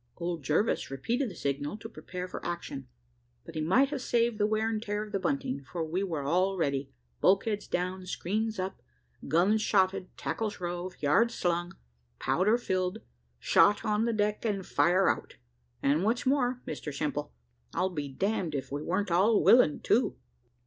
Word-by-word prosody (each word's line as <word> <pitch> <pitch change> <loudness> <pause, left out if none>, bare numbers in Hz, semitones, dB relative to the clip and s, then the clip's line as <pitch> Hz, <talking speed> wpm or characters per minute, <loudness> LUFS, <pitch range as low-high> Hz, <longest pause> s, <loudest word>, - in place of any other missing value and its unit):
Old 170 -2 -3
Jervis 155 - +1
repeated 230 - -1
the 185 - -10
signal 145 +6 -2
to 220 - -8
prepare 180 -5 -7
for 180 - -7
action, 170 -6 -5 0.6
but - - -10
he 155 - -2
might 245 - +4
have 285 -3 -3
saved 235 -2 +1
the 210 - +3
wear 215 +1 +1
and 220 -1 -1
tear 210 -1 -2
of 215 - -10
the 195 - -1
bunting, 140 -5 -1
for 170 -2 -2
we 165 +4 -2
were 165 -7 -2
all 185 +6 +1
ready, 140 -4 -1 0.3
bulkheads 205 +2 +2
down, 185 +1 -2
screens 215 +5 -2
up, 190 +1 -4 0.5
guns 190 +7 +3
shotted, 190 -3 +2
tackles 220 -2 -3
rove, 175 +1 -4
yards 230 +12 +3
slung, 175 0 -1 0.4
powder 210 - +2
filled, 185 -6 -2 0.3
shot 205 - +4
on 210 0 +2
deck, 210 0 0
and 200 -4 -1
fire 185 +3 +3
out - - -1 0.5
and 150 +5 +3
what's 225 +4 +1
more, 255 -2 +1
Mr 150 - -5
Simple, 145 0 -3 0.4
I'll 190 +1 +1
be 150 -4 -3
damned 175 +2 -1
if 135 - -4
we 145 +1 -3
wer'n't 185 +4 -1
all 200 +5 +4
willing 235 -12 +6
too. 245 - +2
185 Hz, 170 wpm, -29 LUFS, 165-215 Hz, 0.6 s, willing